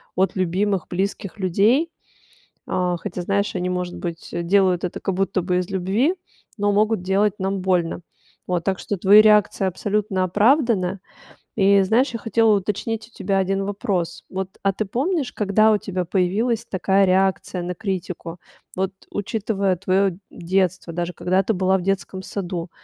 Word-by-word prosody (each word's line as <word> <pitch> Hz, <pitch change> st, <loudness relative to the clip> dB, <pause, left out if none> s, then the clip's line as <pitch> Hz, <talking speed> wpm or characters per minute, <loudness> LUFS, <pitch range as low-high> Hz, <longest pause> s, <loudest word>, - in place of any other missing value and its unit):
от 190 Hz, +1 st, +1 dB
любимых 185 Hz, 0 st, 0 dB
близких 195 Hz, +2 st, -3 dB
людей. 210 Hz, -, +2 dB, 0.8 s
А, 180 Hz, -1 st, 0 dB
хотя, 175 Hz, +1 st, -5 dB
знаешь, 200 Hz, +2 st, -1 dB
они, 180 Hz, 0 st, -1 dB
может 180 Hz, -1 st, -3 dB
быть, 170 Hz, -1 st, -6 dB
делают 180 Hz, +1 st, +2 dB
это 175 Hz, -, -5 dB
как 195 Hz, -, -2 dB
будто 195 Hz, 0 st, 0 dB
бы 180 Hz, +1 st, 0 dB
из 180 Hz, -, -4 dB
любви, 200 Hz, -, +1 dB, 0.4 s
но 205 Hz, 0 st, +1 dB
могут 215 Hz, -1 st, +2 dB
делать 200 Hz, +2 st, +2 dB
нам 190 Hz, 0 st, -1 dB
больно. 180 Hz, -2 st, 0 dB, 0.5 s
Вот, 175 Hz, -2 st, -1 dB
так 190 Hz, -2 st, -1 dB
что 205 Hz, -, -3 dB
твои 205 Hz, +4 st, +7 dB
реакция 210 Hz, -2 st, +4 dB
абсолютно 195 Hz, 0 st, -1 dB
оправдана. 205 Hz, -, +2 dB, 0.6 s
И 200 Hz, -1 st, +5 dB
знаешь, 235 Hz, +8 st, +2 dB
я -, -, -2 dB
хотела 225 Hz, 0 st, +3 dB
уточнить 220 Hz, +3 st, -3 dB
у -, -, -27 dB
тебя 195 Hz, -3 st, -2 dB
один 195 Hz, +1 st, 0 dB
вопрос. 195 Hz, -4 st, -2 dB
Вот, 190 Hz, 0 st, -5 dB
а 195 Hz, -, +2 dB
ты 215 Hz, +3 st, -2 dB
помнишь, 275 Hz, -, -1 dB
когда 215 Hz, +1 st, +3 dB
у 210 Hz, -, +4 dB
тебя 185 Hz, -2 st, -3 dB
появилась 210 Hz, +6 st, 0 dB
такая 190 Hz, 0 st, +2 dB
реакция 190 Hz, -1 st, +1 dB
на 180 Hz, +1 st, -4 dB
критику? 180 Hz, -4 st, -5 dB, 0.4 s
Вот 190 Hz, +1 st, -1 dB, 0.2 s
учитывая 200 Hz, -2 st, -1 dB
твоё 190 Hz, +1 st, +1 dB, 0.2 s
детство, 180 Hz, -1 st, -1 dB
даже 175 Hz, +1 st, -2 dB
когда 185 Hz, +2 st, +1 dB
ты 220 Hz, -, 0 dB
была 190 Hz, +1 st, +2 dB
в 185 Hz, -, -4 dB
детском 190 Hz, 0 st, -2 dB
саду? 180 Hz, -3 st, -5 dB
195 Hz, 160 wpm, -22 LUFS, 180-205 Hz, 0.8 s, твои